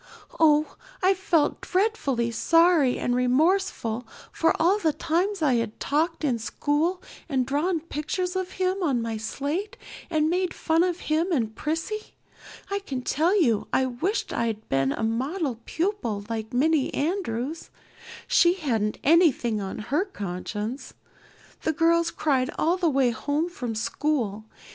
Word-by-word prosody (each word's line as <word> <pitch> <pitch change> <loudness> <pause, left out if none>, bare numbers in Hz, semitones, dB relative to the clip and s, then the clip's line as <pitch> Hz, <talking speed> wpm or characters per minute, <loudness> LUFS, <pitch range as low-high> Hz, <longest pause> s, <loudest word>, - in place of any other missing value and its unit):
Oh, 305 -1 +3 0.3
I 375 +1 +5
felt 360 -5 +1
dreadfully 325 - 0
sorry 330 0 +4
and 245 - 0
remorseful 250 - +1 0.2
for 325 0 +1
all 370 +6 +3
the 320 -6 +1
times 350 +4 -1
I'd 230 -6 +1
talked 315 +4 0
in 250 -6 +1
school 305 +10 -1 0.3
and 260 -3 +1
drawn 315 +6 0
pictures 345 +4 -3
of 375 -1 -3
him 375 +1 -1
on 270 -9 +1
my 225 -1 -3
slate 290 - -3 0.3
and 310 -2 +2
made 360 +2 0
fun 325 0 +2
of 360 -1 -1
him 320 +4 0
and 225 -8 0
Prissy. 325 - -4 0.6
I 400 - 0
can 265 -10 -5
tell 340 +11 +2
you 235 - +2
I 260 - +2
wished 290 - -2
I'd 220 -2 -2
been 135 0 +1
a - - -3
model 260 +4 -1
pupil 320 - -2
like 220 -1 -4
Minnie 290 +3 +2
Andrews. 310 - -2 0.6
She 345 +1 +4
hadn't 230 - -1
anything 275 - +3
on 190 -1 -5
her 285 - 0
conscience. 210 - -5 0.7
The 315 - 0
girls 335 +2 +3
cried 265 -4 0
all 335 +3 +2
the 350 -3 +2
way 270 -4 +2
home 290 +9 -1
from 245 -10 -5
school. 220 -2 -1
300 Hz, 145 wpm, -25 LUFS, 240-350 Hz, 0.7 s, I